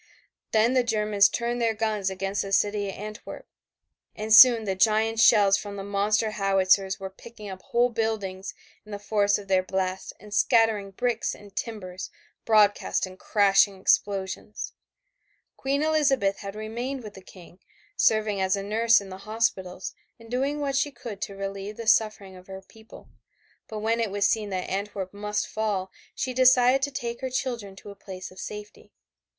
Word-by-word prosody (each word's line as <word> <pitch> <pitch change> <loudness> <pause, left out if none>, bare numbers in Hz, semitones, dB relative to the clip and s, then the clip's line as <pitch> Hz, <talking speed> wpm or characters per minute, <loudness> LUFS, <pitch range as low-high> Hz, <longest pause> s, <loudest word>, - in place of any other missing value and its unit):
Then 225 +3 +3
the 255 -1 +3
Germans 210 -3 +3
turned 240 0 -2
their 225 -1 +1
guns 215 -3 -1
against 195 +1 -2
the 195 - -6
city 205 0 +1
of - - -7
Antwerp 215 +2 -8 0.7
and 215 0 -1
soon 230 0 +9
the 195 -2 -1
giant 220 +3 +2
shells 205 -3 +6
from 205 -1 -7
the 195 - -6
monster 205 +2 0
howitzers 195 -1 +2
were 190 0 -6
picking 215 +1 -12
up 190 -1 -8
whole 240 +4 +1
buildings 210 -4 -3 0.3
in 215 - -14
the - - -3
force 205 0 +1
of 205 -1 -11
their 190 -1 +3
blast 185 0 -3
and 210 +1 -12
scattering 220 -3 +2
bricks 235 +3 -2
and 200 -1 -16
timbers 185 -5 -6 0.4
broadcast 210 -3 +3
in 185 0 -11
crashing 195 0 +3
explosions. 195 +1 -1 0.8
Queen 280 +2 -1
Elizabeth 275 -10 +2
had 200 0 -7
remained 240 +5 -5
with 210 -1 -9
the 190 - -12
King, 180 -1 -16 0.4
serving 215 -2 +2
as 190 0 +2
a 200 - -4
nurse 225 +2 +3
in 195 - -10
the 185 0 -9
hospitals 190 -5 -2 0.3
and 230 0 -15
doing 275 +4 -1
what 280 -2 -2
she 280 +2 +1
could 235 -6 -9
to 200 - -5
relieve 195 +1 -6
the 230 - -6
suffering 215 -3 +1
of 185 0 -15
her 190 0 -9
people, 220 +2 -16 0.6
but 220 - -7
when 225 +2 0
it 225 -2 0
was 200 +1 +1
seen 215 -1 -1
that 185 -2 -3
Antwerp 195 -1 -4
must 210 +1 -2
fall 205 -4 -2 0.2
she 260 -1 -3
decided 255 +1 +5
to 280 - 0
take 235 -2 -5
her 260 - -2
children 240 -6 -4
to 200 +1 -11
a - - -12
place 185 -2 -9
of 185 - -14
safety. 210 0 -9
210 Hz, 175 wpm, -26 LUFS, 195-230 Hz, 0.8 s, soon